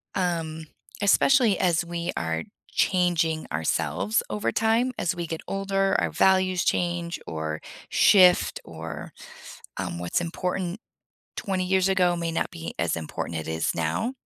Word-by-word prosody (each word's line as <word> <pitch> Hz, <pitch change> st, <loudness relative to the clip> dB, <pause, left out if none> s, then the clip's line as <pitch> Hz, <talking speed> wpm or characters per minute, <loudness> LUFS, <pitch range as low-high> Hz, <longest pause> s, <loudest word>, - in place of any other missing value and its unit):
um, 165 Hz, -4 st, -2 dB, 0.4 s
especially 220 Hz, +1 st, +4 dB
as 175 Hz, -1 st, +2 dB
we 170 Hz, +1 st, -3 dB
are 80 Hz, 0 st, -1 dB, 0.3 s
changing 170 Hz, -4 st, +1 dB
ourselves 80 Hz, +6 st, 0 dB
over 105 Hz, +2 st, -1 dB
time. 225 Hz, -, +2 dB
As 180 Hz, +1 st, -1 dB
we 170 Hz, -1 st, -4 dB
get 165 Hz, 0 st, -4 dB
older, 195 Hz, 0 st, 0 dB
our -, -, 0 dB
values 185 Hz, -1 st, +3 dB
change 175 Hz, -1 st, -1 dB
or 80 Hz, -1 st, -3 dB, 0.3 s
shift 180 Hz, -, +5 dB
or, 80 Hz, -2 st, -8 dB, 0.7 s
um, 85 Hz, -, -4 dB
what's 85 Hz, -, -1 dB
important 180 Hz, +2 st, -3 dB, 0.6 s
20 190 Hz, -2 st, -1 dB
years 190 Hz, 0 st, +2 dB
ago 180 Hz, -2 st, +3 dB
may 170 Hz, -1 st, -2 dB
not -, -, -1 dB
be 165 Hz, -1 st, -7 dB
as 85 Hz, 0 st, 0 dB
important 80 Hz, 0 st, -4 dB
it -, -, -8 dB
is 80 Hz, 0 st, -1 dB
now. 80 Hz, -, -1 dB
175 Hz, 140 wpm, -26 LUFS, -, 0.7 s, shift